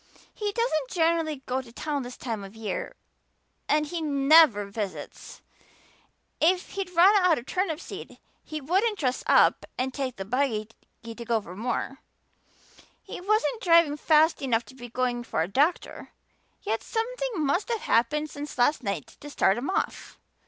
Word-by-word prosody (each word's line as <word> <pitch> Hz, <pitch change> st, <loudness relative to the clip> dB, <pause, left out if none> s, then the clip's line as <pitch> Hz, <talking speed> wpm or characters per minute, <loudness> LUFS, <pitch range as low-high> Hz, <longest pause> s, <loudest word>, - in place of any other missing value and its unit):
"He 415 Hz, -1 st, -3 dB
doesn't 355 Hz, -, -1 dB
generally 325 Hz, -4 st, 0 dB
go 255 Hz, +1 st, -1 dB
to 245 Hz, -3 st, -15 dB
town 290 Hz, +3 st, -3 dB
this 245 Hz, 0 st, -8 dB
time 225 Hz, -5 st, -4 dB
of 195 Hz, +2 st, -11 dB
year 220 Hz, -1 st, -4 dB, 0.7 s
and 300 Hz, 0 st, +3 dB
he 330 Hz, +2 st, -4 dB
never 285 Hz, -6 st, +5 dB
visits; 200 Hz, -7 st, -7 dB, 1.0 s
if 360 Hz, +3 st, +2 dB
he'd 390 Hz, -2 st, -4 dB
run 365 Hz, +4 st, +7 dB
out 350 Hz, -4 st, +4 dB
of 240 Hz, -, -7 dB
turnip 360 Hz, -3 st, -1 dB
seed -, -, -9 dB, 0.3 s
he 310 Hz, -, -6 dB
wouldn't 385 Hz, -, +1 dB
dress 255 Hz, -6 st, -1 dB
up -, -, +5 dB
and 260 Hz, +1 st, -2 dB
take 260 Hz, -3 st, -3 dB
the 195 Hz, -, -6 dB
buggy 225 Hz, -2 st, -1 dB, 0.3 s
to 230 Hz, 0 st, -7 dB
go 235 Hz, -1 st, -1 dB
for 180 Hz, -4 st, -11 dB
more; 250 Hz, +5 st, -3 dB, 1.0 s
he -, -, -8 dB
wasn't 430 Hz, +4 st, +1 dB
driving 335 Hz, -4 st, +5 dB
fast 310 Hz, +2 st, +3 dB
enough 240 Hz, -4 st, 0 dB
to -, -, -14 dB
be 245 Hz, -2 st, -10 dB
going 245 Hz, 0 st, -1 dB
for 160 Hz, -, -1 dB
a -, -, -3 dB
doctor. 285 Hz, -, 0 dB, 0.5 s
Yet 225 Hz, +1 st, -1 dB
something -, -, -3 dB
must 320 Hz, -, 0 dB
have 460 Hz, -2 st, -1 dB
happened 295 Hz, +7 st, +1 dB
since 290 Hz, -1 st, -7 dB
last 280 Hz, +5 st, +3 dB
night 200 Hz, -4 st, -5 dB
to 290 Hz, -, -9 dB
start 195 Hz, -8 st, +2 dB
him 265 Hz, -, -4 dB
off. 385 Hz, -, -3 dB
285 Hz, 165 wpm, -26 LUFS, 240-335 Hz, 1.0 s, run